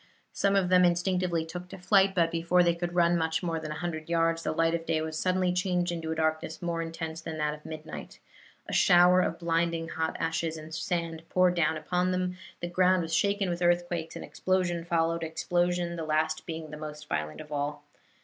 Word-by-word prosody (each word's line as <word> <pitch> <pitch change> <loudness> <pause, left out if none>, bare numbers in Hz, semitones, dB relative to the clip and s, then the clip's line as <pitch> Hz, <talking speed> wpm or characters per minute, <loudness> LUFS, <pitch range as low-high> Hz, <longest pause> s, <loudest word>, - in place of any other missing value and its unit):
Some 200 0 +2
of 190 -2 +2
them 180 0 +6
instinctively 175 -1 +1
took 180 +2 -8
to - - -8
flight, 195 +1 +3
but 165 -2 +3
before 170 +2 +3
they 170 -1 +3
could 175 +1 -4
run 170 0 +4
much 160 +1 0
more 165 -2 -1
than 155 -1 -6
a 150 - -4
hundred 160 -1 -4
yards 165 0 +2
the - - -1
light 165 +1 +2
of 170 -1 -1
day 160 -1 +1
was 160 0 -4
suddenly 185 -1 +1
changed 180 -1 0
into 165 -2 -4
a - - -1
darkness 160 0 -1
more 170 -1 -2
intense 165 0 -5
than 160 -1 -6
that 150 -1 0
of 150 0 -11
midnight; 155 0 -8 0.5
a - - -5
shower 180 +1 +6
of 170 - -1
blinding 165 -1 0
hot 160 -1 -2
ashes 165 0 -1
and 155 +1 -10
sand 165 0 -2
poured 185 -1 +4
down 160 -2 +1
upon 180 +4 0
them; 185 0 -1 0.3
the 175 - -2
ground 185 +1 +3
was 165 0 -5
shaken 200 +2 +2
with 175 0 -3
earthquakes, 175 -1 0
and - - -6
explosion 180 -2 0
followed 165 -1 +1
explosion, 175 +2 0
the 165 - -3
last 155 0 0
being 160 -2 -6
the 150 - -7
most 150 0 -8
violent 75 - -3
of 150 -1 -10
all. 145 0 -3
170 Hz, 210 wpm, -29 LUFS, 160-180 Hz, 0.5 s, them